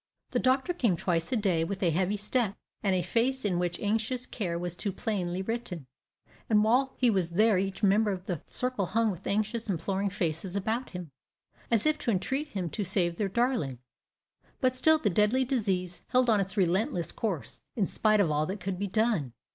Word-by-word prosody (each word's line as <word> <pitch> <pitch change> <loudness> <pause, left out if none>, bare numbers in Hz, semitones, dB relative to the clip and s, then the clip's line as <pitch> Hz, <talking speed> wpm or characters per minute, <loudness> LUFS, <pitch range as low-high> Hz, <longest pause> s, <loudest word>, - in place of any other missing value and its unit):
The - - +1
doctor 265 +7 +2
came 230 - +1
twice 165 -1 0
a - - +2
day, 190 -7 +1
with 195 +3 -3
a 170 - +3
heavy 190 +5 +1
step, 210 0 0 0.3
and 195 -3 +2
a 180 - +1
face 260 +2 0
in 180 -4 +1
which 175 -1 -1
anxious 225 +4 -1
care 180 -10 -3
was 175 0 -3
too 200 - -2
plainly 185 -3 -2
written; 215 - -4 0.6
and 210 -2 +5
while 255 +5 +2
he 245 -2 +4
was 185 -5 +1
there 205 +2 +3
each 195 +1 -3
member 205 +2 +4
of 185 -1 -5
the 175 -6 -3
circle 250 -7 -2
hung 220 +3 +2
with 185 0 -8
anxious, 215 +2 -1
imploring 195 +3 -1
faces 180 -1 -2
about 220 +6 -1
him, 180 -5 -7 0.6
as 230 -3 +3
if 305 0 +2
to - - -2
entreat 265 +9 0
him 190 -10 -3
to 210 - -2
save 175 -3 +1
their 205 -2 0
darling; 235 - 0 0.8
but 255 -2 +2
still 315 +5 +5
the 215 -10 0
deadly 210 +8 +3
disease 190 -9 -1
held 250 -1 +3
on 215 - +4
its 195 +2 -2
relentless 185 -1 +1
course, 195 -10 -4
in 210 - +2
spite 215 +3 +2
of 180 -6 +3
all 150 +1 +1
that 195 +2 -4
could 185 0 -4
be 200 - -1
done. 205 - +1
200 Hz, 200 wpm, -29 LUFS, 180-230 Hz, 0.8 s, and